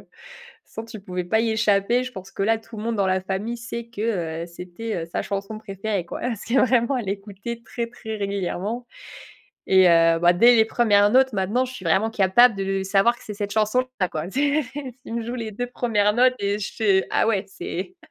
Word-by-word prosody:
toute - - -29 0.6
façon, 225 - -7
tu 225 -2 -10
pouvais 180 -2 -4
pas 220 +5 +2
y 225 0 0
échapper. 220 +2 +2
Je 255 - -7
pense 190 -3 -9
que 195 - -4
là, 225 +2 +2
tout 225 0 -13
le 210 - -6
monde 230 -1 -2
dans 195 -1 +1
la 185 0 +1
famille 195 +5 -3
sait 235 0 -6
que, 195 -8 -3
heu, - - -10
c'était, 180 +6 -7
heu, - - -12
sa 170 - -3
chanson 200 +2 -4
préférée, 200 -2 -3
quoi. - - -6
Parce 235 -4 -3
que 235 - -3
vraiment, 250 +1 +2
elle 230 -6 -4
écoutait 205 +3 -6
très, 235 0 -4
très 225 -2 -7
régulièrement. 200 +3 -3 0.8
Et 190 -1 +6
heu, 165 0 +5
bah, 175 0 +5
dès 235 +8 +6
les 220 -1 +5
1res 205 -3 +3
notes 260 +1 +4
maintenant, 205 +6 0
je 255 - -7
suis 220 -7 -10
vraiment 190 +7 +2
capable 220 +4 +5
de 195 0 -1
savoir 195 +5 +3
que - - -17
c'est 210 - -6
cette 205 0 -4
chanson 220 +4 +2 0.2
là, 185 - +2
quoi. 160 +3 -5
C'est 285 +5 +1
c'est 270 -3 -6
si 250 +1 -35
tu - - -7
me 235 0 -2
joues 240 - -4
les 230 -3 -4
2 245 +4 -3
premières 220 -4 +1
notes 250 +3 +4
et 200 +1 -1
je 195 - -4
fais: 195 -4 +2
«Ah - - +2
ouais, 210 -3 +1
c'est» 195 - -6
215 Hz, 230 wpm, -23 LUFS, 195-235 Hz, 0.8 s, Et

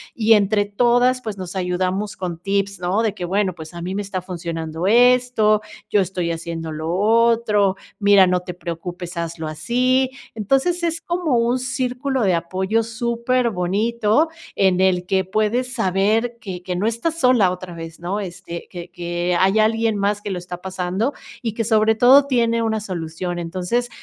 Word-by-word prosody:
y, 225 -1 +4
entre 205 0 +3
todas, 245 +4 +2
pues, 215 -4 -5
nos 185 0 -7
ayudamos 185 +2 -1
con 175 -3 -4
tips, 200 0 -1
¿no? 185 +5 0
De 220 -3 0
que: 180 - -5
"Bueno, 190 0 0
pues, 160 0 -10
a 170 - -7
mí 185 +2 -4
me 205 - -1
está 195 -2 -4
funcionando 170 -1 -4
esto, 245 -2 +4 0.3
yo 205 - +3
estoy 180 -2 -2
haciendo 165 -1 -5
lo 160 +2 -3
otro. 215 -1 +3 0.2
Mira, 200 -2 +6
no 180 0 +1
te 180 0 -7
preocupes, 175 +1 -6
hazlo 165 -1 -4
así". 250 +11 +1 0.3
Entonces, 270 - +1
es 330 0 -1
como 340 -8 0
un 240 +2 +1
círculo 255 0 -2
de 185 -3 +3
apoyo 190 +6 0
superbonito 235 - 0 0.3
en 190 -1 +3
el 180 -1 +2
que 190 0 +1
puedes 215 +6 0
saber 220 +3 +1
que 180 -4 -7
que 180 -1 -3
no 200 +5 0
estás 315 +9 -2
sola 245 -8 +4
otra 180 -1 -7
vez, 165 0 -8
¿no? 185 +4 -3
Este, 180 -2 -7
que 175 -1 -8
que 175 0 -2
hay 195 +3 +3
alguien 225 0 +2
más 205 +1 0
que 205 - -5
lo 180 - -3
está 180 0 -8
pasando 190 +7 -2 0.3
y 225 -3 -3
que, 225 +1 -2
sobre 220 0 +3
todo, 260 +5 +6
tiene 235 -4 +1
una 220 -1 0
solución. 175 -2 -4
Entonces, 185 +8 -2
200 Hz, 170 wpm, -21 LUFS, 180-235 Hz, 0.3 s, Mira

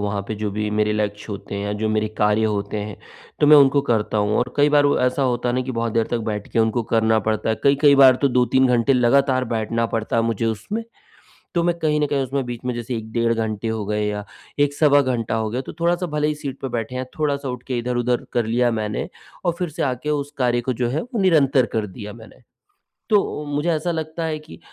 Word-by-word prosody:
वहाँ 100 0 -1
पे 110 - -2
जो 105 0 -3
भी 105 +1 -2
मेरे 105 0 +1
लक्ष्य 105 -1 -2
होते 100 0 -6
हैं 100 - -3
या 105 - -2
जो 110 - +1
मेरे 110 0 0
कार्य 105 +1 +3
होते 105 -1 -2
हैं, 105 -1 -5 0.4
तो 150 - +5
मैं 150 0 +9
उनको 140 0 +5
करता 110 -4 0
हूँ 105 +1 +1
और 125 0 -1
कई 145 +1 +4
बार 145 -1 +4
वो 145 - +2
ऐसा 125 +2 +1
होता 125 -1 0
है 120 - 0
ना 130 - +1
कि 130 0 -5
बहुत 115 -1 -2
देर 115 -1 +1
तक 120 - 0
बैठ 105 -1 -4
के - - 0
उनको 115 +1 +2
करना 110 0 +2
पड़ता 110 0 -1
है, 110 - +2
कई-कई 140 +1 +5
बार 130 -2 +7
तो 140 - +4
2-3 125 +1 +3
घंटे 125 +2 +3
लगातार 130 +1 +3
बैठना 115 +1 -1
पड़ता 115 0 -2
है 115 - +3
मुझे 115 -1 -1
उसमें। 115 - -3 0.7
तो 170 - +2
मैं 170 0 0
कहीं 150 -2 +1
न 150 - +2
कहीं 140 -1 0
उसमें 135 +1 -2
बीच 120 -1 -5
में 125 - -1
जैसे 120 +1 -4
1 110 0 -7
डेढ़ 115 -1 +1
घंटे 110 -1 -2
हो 110 -2 -2
गए 105 0 -1
या 105 0 -3 0.4
1 145 0 +3
सवा 145 -1 +5
घंटा 120 -5 -1
हो 110 -1 -1
गया 125 +4 -2
तो - - -8
थोड़ा-सा 175 +1 +1
भले 150 0 +1
ही 150 - 0
सीट 140 -2 -6
पे 135 - -3
बैठे 120 0 -4
हैं, 130 - -2
थोड़ा-सा 140 -2 -1
उठ 125 -1 -5
के 130 - -2
इधर-उधर 120 0 -1
कर 120 -2 0
लिया 120 +2 +2
मैंने 105 +1 -3 0.4
और 175 - +2
फिर 180 -2 -1
से 150 - -4
आके 130 +2 -2
उस 145 -1 -2
कार्य 120 -2 +2
को 130 +2 -2
जो 120 0 -1
है, 140 +6 -1
वो 240 -3 -4
निरंतर 145 -8 +4
कर 110 -1 0
दिया 105 +2 -9
मैंने। 115 +2 -15 0.7
तो 200 -7 +1
मुझे 145 +3 -1
ऐसा 160 +3 -1
लगता 160 0 -3
है 155 -1 -2
कि 155 +1 -13
125 Hz, 250 wpm, -21 LUFS, 110-145 Hz, 0.7 s, मैं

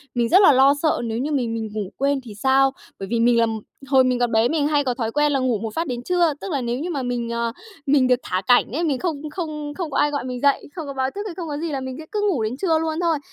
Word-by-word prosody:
mình 235 -1 +1
rất 380 +3 +6
là 335 - +8
lo 270 +2 +6
sợ 315 - +2
nếu 225 0 -3
như 295 +4 -2
mình 245 -5 0
mình 220 -1 -3
ngủ 205 -3 -3
quên 275 0 +1
thì 215 -4 -10
sao? 265 +4 +3 0.3
Bởi 195 - -5
vì 235 - +1
mình 235 0 +4
là 230 - +4 0.4
hồi 265 -1 +5
mình 250 -1 +1
còn 240 -1 +1
bé 225 +2 +3
mình 300 -2 +1
hay 295 -1 +2
có 250 -2 0
thói 225 -2 -3
quen 295 +3 +2
là 275 - +1
ngủ 250 -5 0
một 225 -1 -5
phát 330 0 -1
đến 245 -1 -4
trưa, 345 -2 +2
tức 390 - -5
là 280 - -1
nếu 240 +1 -2
như 340 - -3
mà 280 -6 -2
mình, 240 -1 -2
ờ, 235 0 -1 0.3
mình 270 -2 +3
được 250 -1 +3
thả 185 +1 -2
cảnh 245 -1 +4
ấy, 320 +6 -2
mình 285 -6 0
không 310 -4 -3
không 300 -3 -5
không 325 -2 -5
có - - -1
ai 295 - +3
gọi 285 -3 -2
mình 250 -1 -5
dậy, 280 -1 +2
không 320 -5 -5
có 275 - -5
báo 265 0 -1
thức 405 - -3
hay 345 - -7
không 345 -3 -5
có 290 -1 -4
gì 330 +1 -3
là 270 -2 -3
mình 260 -1 -5
sẽ 315 - -8
cứ 420 - -1
ngủ 260 - 0
đến 230 +4 -3
trưa 325 -3 +1
luôn 320 0 -2
thôi. 330 -3 +2
270 Hz, 315 wpm, -22 LUFS, 240-310 Hz, 0.4 s, là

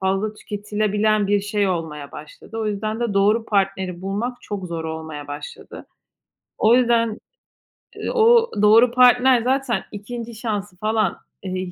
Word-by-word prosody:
fazla 195 +3 -1
tüketilebilen 210 0 -1
bir 205 0 +2
şey 205 -1 0
olmaya 150 -5 -4
başladı. 155 +9 -10
O 220 - -2
yüzden 215 +2 -3
de 235 -4 -1
doğru 210 +3 +3
partneri 190 -3 -1
bulmak 210 +6 -3
çok 200 -3 -5
zor 165 -2 -5
olmaya 160 -2 -6
başladı. 145 +1 -9 0.7
O 225 +3 +5
yüzden, 230 -3 +2 0.9
o 465 0 +5
doğru 225 +3 +6
partner 250 0 +5
zaten 260 +1 0
2'nci 230 +3 -7
şansı 205 -4 -4
falan, 215 +2 0 0.3
eee, 185 -1 -4
210 Hz, 135 wpm, -21 LUFS, 190-230 Hz, 0.9 s, doğru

